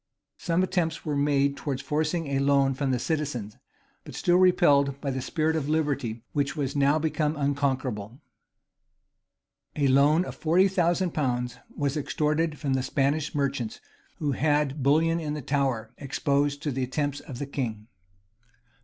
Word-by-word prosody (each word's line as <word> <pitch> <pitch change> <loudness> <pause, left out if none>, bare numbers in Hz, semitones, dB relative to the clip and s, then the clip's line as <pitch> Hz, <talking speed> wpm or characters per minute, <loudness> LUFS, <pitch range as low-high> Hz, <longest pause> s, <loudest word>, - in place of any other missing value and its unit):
Some 175 +1 +1
attempts 175 -4 -1
were 150 -2 -1
made 140 -1 +2
towards 140 -2 -3
forcing 155 +1 -1
a 135 -1 0
loan 140 -1 +3
from 135 +1 -2
the 130 - +1
citizens; 125 -7 -3 0.5
but - - -10
still 175 0 +3
repelled 145 -7 +4
by 140 -2 -2
the 130 0 -3
spirit 160 +3 0
of 150 -2 -2
liberty, 140 -8 -1
which 145 0 0
was 140 -3 -2
now 140 +1 +3
become 155 0 0
unconquerable.[] 135 -6 -2 1.6
A 145 -2 +2
loan 145 +6 +4
of - - -6
forty 175 +4 +3
thousand 175 -1 +1
pounds 125 -4 -1 0.2
was 145 0 0
extorted 150 +1 0
from 140 -3 -1
the 130 - +1
Spanish 140 +3 0
merchants, 135 -5 -2 0.4
who 150 -3 -1
had 145 0 +1
bullion 160 +5 +3
in 150 -2 -3
the 150 - -4
Tower 130 -5 -1
exposed 140 +1 0
to 150 - -1
the 135 0 -2
attempts 145 +2 -2
of 130 - -9
the 145 - -3
king. 115 -6 -4
145 Hz, 155 wpm, -27 LUFS, 135-155 Hz, 1.6 s, repelled